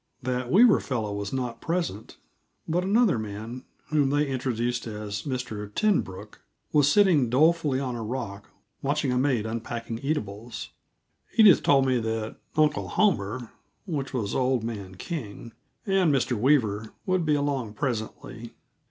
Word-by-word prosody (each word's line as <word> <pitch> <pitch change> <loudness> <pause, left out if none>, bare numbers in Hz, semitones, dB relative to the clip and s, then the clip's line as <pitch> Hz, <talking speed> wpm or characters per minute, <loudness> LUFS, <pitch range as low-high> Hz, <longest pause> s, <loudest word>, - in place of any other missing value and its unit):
That 125 0 -2
Weaver 220 +4 +6
fellow 110 -6 -3
was 100 0 -4
not 125 -3 -3
present, 165 - -3 0.5
but 175 +3 0
another 200 - +3
man, 110 +4 -6 0.2
whom 150 -3 +2
they 145 +1 +2
introduced 125 -2 -2
as 105 -2 -5
Mr. 110 -6 -4
Tenbrooke, 140 - -1 0.3
was 145 -1 +5
sitting 175 - +4
dolefully 150 +1 +3
on 130 -3 -3
a 115 - -4
rock, 110 -4 -5 0.3
watching 140 -1 0
a 125 - +1
maid 130 -5 +1
unpacking 115 0 -4
eatables. 115 -5 -4 0.7
Edith 210 -7 +8
told 135 -2 +4
me 130 -2 +2
that 110 -1 -3 0.2
"Uncle 150 -1 +2
Homer" 120 - 0 0.3
which 145 -8 -3
was 110 -6 -2
old 130 -2 +1
man 100 -5 -5
King 115 - -6 0.3
and 195 -5 +3
Mr. 130 -2 +1
Weaver 110 -4 +1
would 185 -2 +1
be 155 -2 +2
along 140 -7 -1
presently. 115 -2 -4
125 Hz, 140 wpm, -26 LUFS, 110-150 Hz, 0.7 s, Edith